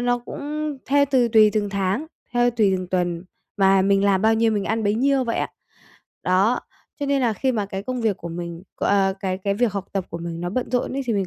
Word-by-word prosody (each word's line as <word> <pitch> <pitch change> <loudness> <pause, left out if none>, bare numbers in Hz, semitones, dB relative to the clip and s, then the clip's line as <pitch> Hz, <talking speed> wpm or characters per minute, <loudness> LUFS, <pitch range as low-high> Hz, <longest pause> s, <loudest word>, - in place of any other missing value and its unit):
nó 245 0 +1
cũng 295 +3 -5
theo 285 +1 +4
từ 250 -3 +3
tùy 215 -2 +6
từng 210 -2 0
tháng, 200 +9 -1 0.3
theo 245 0 +3
tùy 215 -5 +2
từng 185 - -5
tuần 175 -1 -1 0.3
mà 195 -1 +4
mình 195 0 +3
làm 195 -1 +3
bao 220 0 +4
nhiêu 225 0 +2
mình 205 -2 -1
ăn 220 0 -1
bấy 205 +1 +2
nhiêu 270 +2 +2
vậy 230 - -1
à. - - -1 0.7
Đó, 190 +7 +2 0.4
cho 285 - -1
nên 280 -1 +2
là 240 -3 +2
khi 260 +6 0
mà 210 -4 -1
cái 195 0 -5
công 255 +3 -3
việc 220 -4 +1
của 170 - -7
mình, 170 0 -6
ờ 195 -1 +2
cái 190 -1 -2
cái 200 +1 -1
việc 230 -1 +1
học 200 -2 -3
tập 195 -2 -1
của 170 - -5
mình 170 0 -5
nó 175 - -3
bận 250 +5 -2
rộn 250 0 0
ấy, 275 - -2
thì 235 - +1
mình 195 -3 0
210 Hz, 250 wpm, -23 LUFS, 190-245 Hz, 0.7 s, tùy